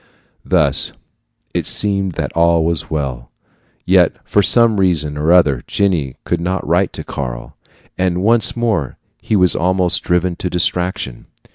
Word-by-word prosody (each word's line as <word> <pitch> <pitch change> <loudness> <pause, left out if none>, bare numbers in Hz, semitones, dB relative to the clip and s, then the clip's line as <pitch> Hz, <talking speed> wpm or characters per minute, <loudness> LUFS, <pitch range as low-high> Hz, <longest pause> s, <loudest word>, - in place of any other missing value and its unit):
Thus - - +1 0.6
it - - -2
seemed 100 -3 +1
that - - -4
all 85 -1 +2
was 85 -2 0
well, 70 -6 -4 0.6
yet - - +3
for 105 - +2
some 115 0 +3
reason 80 -6 +1
or 75 +3 0
other 75 -8 +3
Jenny 85 -10 -1
would 85 -1 -1
not 95 +2 -2
write 90 +4 +1
to - - -6
Karl, - - -6 0.4
and 90 0 0
once 115 +2 +2
more 110 - -1 0.2
he 110 - -1
was 90 -3 +3
almost 90 0 +2
driven 90 0 0
to 90 - -3
distraction. 90 -6 -2
90 Hz, 145 wpm, -17 LUFS, 80-95 Hz, 0.6 s, yet